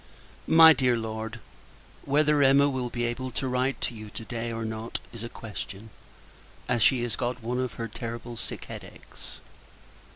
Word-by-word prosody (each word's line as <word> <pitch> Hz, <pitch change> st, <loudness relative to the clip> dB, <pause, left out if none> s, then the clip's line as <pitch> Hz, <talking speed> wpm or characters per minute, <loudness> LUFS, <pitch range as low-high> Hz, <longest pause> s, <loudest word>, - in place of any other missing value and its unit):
MY 160 Hz, 0 st, +9 dB
DEAR 125 Hz, -4 st, +2 dB
LORD, 110 Hz, +1 st, -5 dB, 0.7 s
Whether 150 Hz, +1 st, +3 dB
Emma 140 Hz, +1 st, +6 dB
will 130 Hz, -3 st, -2 dB
be 120 Hz, 0 st, -3 dB
able 120 Hz, +2 st, -2 dB
to 130 Hz, +2 st, -2 dB
write 130 Hz, +1 st, 0 dB
to -, -, -1 dB
you 110 Hz, -2 st, -9 dB
to 110 Hz, -, -8 dB
day, 120 Hz, 0 st, -4 dB
or 115 Hz, 0 st, -3 dB
not, 110 Hz, +1 st, -4 dB
is 115 Hz, -, -8 dB
a 115 Hz, -, -5 dB
question; 110 Hz, -1 st, -8 dB, 0.8 s
as 120 Hz, -, +1 dB
she 125 Hz, +1 st, +4 dB
has 120 Hz, -, -1 dB
got 125 Hz, -1 st, -3 dB
one 125 Hz, +2 st, -1 dB
of 130 Hz, -2 st, -2 dB
her 115 Hz, -, -4 dB
terrible 115 Hz, +1 st, -6 dB
sick 110 Hz, -, -6 dB
head -, -, -7 dB
achs. -, -, -13 dB
120 Hz, 175 wpm, -27 LUFS, 115-130 Hz, 0.8 s, MY